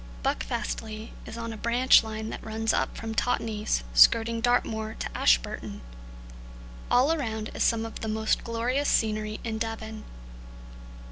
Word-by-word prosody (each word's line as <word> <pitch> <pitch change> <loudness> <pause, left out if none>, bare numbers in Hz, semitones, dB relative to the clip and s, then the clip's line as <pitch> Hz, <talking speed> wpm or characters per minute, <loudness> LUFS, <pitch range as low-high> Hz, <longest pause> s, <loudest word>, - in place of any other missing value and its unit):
Buckfastleigh 215 - -3 0.2
is 225 - -7
on 230 -1 -4
a - - -8
branch 235 +3 +5
line 220 0 -5
that - - -7
runs 225 0 -1
up - - -1
from 225 -1 -5
Totnes, 220 - 0
skirting 230 - +5
Dartmoor, 220 -2 0
to - - -5
Ashburton. - - +1 1.1
All 265 +6 +4
around 220 -8 -3
is - - -5
some 225 -1 +2
of 225 - -7
the 220 - -4
most 220 0 0
glorious 245 +5 0
scenery 215 -1 0
in 220 -2 -3
Devon. 220 -1 -5
220 Hz, 140 wpm, -27 LUFS, 215-230 Hz, 1.1 s, branch